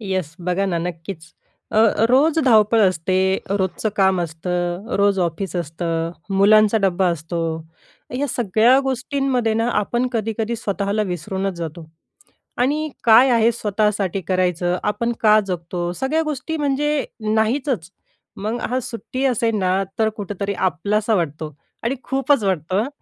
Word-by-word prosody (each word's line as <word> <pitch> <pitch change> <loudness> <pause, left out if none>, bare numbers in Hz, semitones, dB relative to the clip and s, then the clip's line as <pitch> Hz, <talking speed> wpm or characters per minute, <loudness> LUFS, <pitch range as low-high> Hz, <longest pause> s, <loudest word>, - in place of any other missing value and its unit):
Yes, 185 -6 -3
बघा 180 +2 +1
ना, 175 -3 -1
नक्कीच, 170 0 -6 0.5
अ, - - +1 0.3
रोज 300 +5 +4
धावपळ 225 -2 +5
असते, 185 +1 -1 0.3
रोजचं 200 +2 -1
काम 190 -2 +3
असतं, 175 +3 -3
रोज 200 0 +2
ऑफिस 180 +3 -2
असतं, 165 0 -2 0.3
मुलांचा 215 +2 +5
डब्बा 190 0 +2
असतो. 170 +1 -4 0.8
या 285 - 0
सगळ्या 235 +2 +3
गोष्टींमध्ये 265 -3 -1
ना, 225 +2 +1
आपण 240 +4 0
कधीकधी 225 0 -2
स्वतःला 205 0 -1
विसरूनच 190 +1 -3
जातो 165 0 -6 0.7
आणि 295 +5 +1 0.2
काय 235 +3 +7
आहे, 230 -1 +4
स्वतःसाठी 210 -3 -1
करायचं, 180 -1 +1
आपण 235 +3 0
का 215 -1 +6
जगतो, 175 -1 -3
सगळ्या 305 +5 +1
गोष्टी 305 +1 -3
म्हणजे 295 0 0 0.3
नाहीचच. 220 - 0 0.5
मग 220 +4 -3
हां, 255 - +1
सुट्टी 255 +3 -5
असेल 230 -3 +1
ना, 185 0 +1 0.2
तर 220 -1 +3
कुठेतरी 200 -1 -4
आपलासा 200 +5 0
वाटतो 155 -4 -2 0.3
आणि 245 +3 0
खूपच 270 -1 +1
वाटतं. 190 - 0
205 Hz, 130 wpm, -21 LUFS, 180-235 Hz, 0.8 s, काय